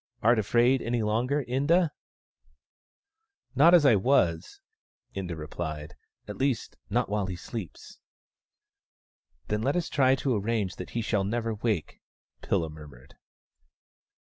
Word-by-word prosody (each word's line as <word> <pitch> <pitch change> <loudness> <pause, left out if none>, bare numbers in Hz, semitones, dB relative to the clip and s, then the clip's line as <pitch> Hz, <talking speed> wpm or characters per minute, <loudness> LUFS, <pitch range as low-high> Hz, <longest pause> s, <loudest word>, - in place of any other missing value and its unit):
Art 115 +1 +4
afraid 120 +5 +3
any 120 -1 -1
longer, 125 +7 0
Inda? 150 +7 +2 0.5
" 65 - -45
" 425 - -45
Not 170 +2 +8
as 165 -4 +5
I 140 - +7
was," 95 -7 +1 0.6
Inda 90 -4 -4
replied, 75 -1 -6 0.2
" - - -47
At 105 - -7
least, 130 -4 -1
not 120 +4 +1
white 100 -1 -2
he 90 - -4
sleeps." 95 0 -8 0.8
" 60 -1 -47
Then 105 - 0
let 135 +7 0
us 175 -1 -1
try 130 -2 +3
to 135 -2 -1
arrange 105 -3 -1
that 90 - -7
he 115 - 0
shall 110 -3 0
never 115 +3 -2
wake," 105 -6 -3 0.4
Pilla 80 -2 -1
murmured. 70 -4 -14
110 Hz, 145 wpm, -27 LUFS, 90-130 Hz, 0.8 s, Not